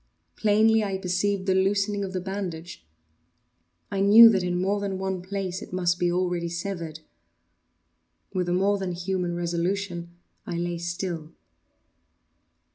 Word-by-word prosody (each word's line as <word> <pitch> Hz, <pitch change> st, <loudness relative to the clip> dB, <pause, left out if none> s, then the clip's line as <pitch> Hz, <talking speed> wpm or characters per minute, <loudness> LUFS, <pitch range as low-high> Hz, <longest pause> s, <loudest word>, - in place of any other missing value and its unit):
Plainly 220 Hz, +1 st, +3 dB
I 195 Hz, -2 st, -2 dB
perceived 190 Hz, +1 st, -1 dB
the 190 Hz, -, +2 dB
loosening 200 Hz, +2 st, +1 dB
of 190 Hz, -, -4 dB
the 185 Hz, -, -2 dB
bandage. 180 Hz, -, -6 dB, 1.1 s
I 195 Hz, -, -2 dB
knew 215 Hz, +4 st, +9 dB
that 195 Hz, -4 st, +2 dB
in 180 Hz, 0 st, -1 dB
more 195 Hz, +3 st, 0 dB
than 200 Hz, -2 st, -3 dB
one 190 Hz, -1 st, -3 dB
place 190 Hz, -1 st, -4 dB
it -, -, -10 dB
must 180 Hz, -1 st, 0 dB
be 175 Hz, 0 st, +2 dB
already 175 Hz, -1 st, -1 dB
severed. 170 Hz, -3 st, -5 dB, 1.3 s
With 180 Hz, -2 st, -1 dB
a -, -, 0 dB
more 200 Hz, +2 st, +2 dB
than 185 Hz, -2 st, -3 dB
human 180 Hz, 0 st, -2 dB
resolution 175 Hz, 0 st, -2 dB, 0.3 s
I 170 Hz, -, -4 dB
lay 175 Hz, 0 st, -2 dB
still. 170 Hz, -2 st, -4 dB
185 Hz, 140 wpm, -26 LUFS, 175-200 Hz, 1.3 s, knew